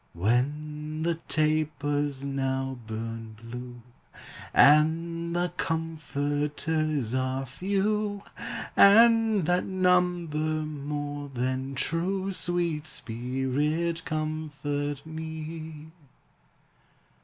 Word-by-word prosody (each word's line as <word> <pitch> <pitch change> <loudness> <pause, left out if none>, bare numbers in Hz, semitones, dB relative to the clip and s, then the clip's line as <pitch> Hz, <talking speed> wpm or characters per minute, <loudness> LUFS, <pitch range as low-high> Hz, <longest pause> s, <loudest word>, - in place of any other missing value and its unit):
When 150 - -1
the 170 -1 0
tapers 145 -2 0
now 135 -1 -1
burn 115 0 -5
blue, 120 +1 -8 0.7
And 165 +3 +4
the 175 0 0
comforters 150 -3 -1
are 130 +1 0
few, 200 - -1 0.5
And 225 0 +7
that 180 +2 +2
number 180 -4 +2
more 145 -2 -3
than 130 +1 -2
true, 185 +7 0
Sweet 170 -4 -1
Spirit, 135 +7 -1
comfort 145 -2 -3
me! 160 0 -7
155 Hz, 75 wpm, -28 LUFS, 135-165 Hz, 0.7 s, And